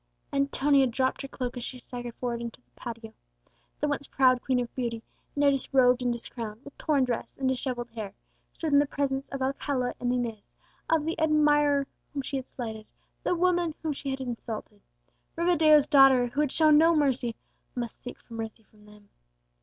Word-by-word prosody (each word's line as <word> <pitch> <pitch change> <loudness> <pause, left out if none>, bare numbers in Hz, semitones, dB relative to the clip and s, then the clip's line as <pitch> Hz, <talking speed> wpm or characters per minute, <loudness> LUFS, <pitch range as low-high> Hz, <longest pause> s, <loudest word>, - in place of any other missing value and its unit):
Antonia 275 0 +3
dropped 260 +2 0
her 275 - -5
cloak 250 -2 -4
as 245 - -5
she 255 - -5
staggered 245 -1 -7
forward 240 -2 -3
into 235 0 -6
the - - -38
patio; 230 -2 -8 0.7
the 295 - +1
once 285 -1 -2
proud 255 -2 +3
queen 260 -2 +1
of 240 -1 -4
beauty, 235 -3 -3 0.3
now 285 -1 +4
disrobed 260 -2 +3
and 245 -1 +1
discrowned, 230 -2 -6
with 285 - -11
torn 290 -4 +1
dress 245 -2 -3
and 265 - -1
dishevelled 250 -2 -2
hair, 215 -3 -6 0.4
stood 315 -3 -3
in 285 - +7
the 290 - +2
presence 275 -1 -2
of 275 -1 -3
Alcala 265 -1 -1
and 245 0 0
Inez, 235 -4 -2 0.5
of 320 -2 +2
the 325 +1 -2
admirer 295 -2 +3 0.3
whom 275 - -2
she 275 - -3
had 265 - -6
slighted, 220 -3 -6 0.3
the - - +1
woman 350 -2 +1
whom 315 -2 0
she 275 0 -5
had 265 0 -2
insulted! 235 -3 -6 0.5
Rivadeo's 320 -4 +5
daughter, 270 -4 +6
who 275 +5 -1
had 295 -3 +1
shown 305 -2 +5
no 330 +1 +5
mercy, 260 -6 +1 0.4
must 240 -2 -5
seek 245 - -8
for 235 - -14
mercy 225 0 -6
from 210 0 -22
them! 210 -1 -18
260 Hz, 185 wpm, -28 LUFS, 240-285 Hz, 0.7 s, in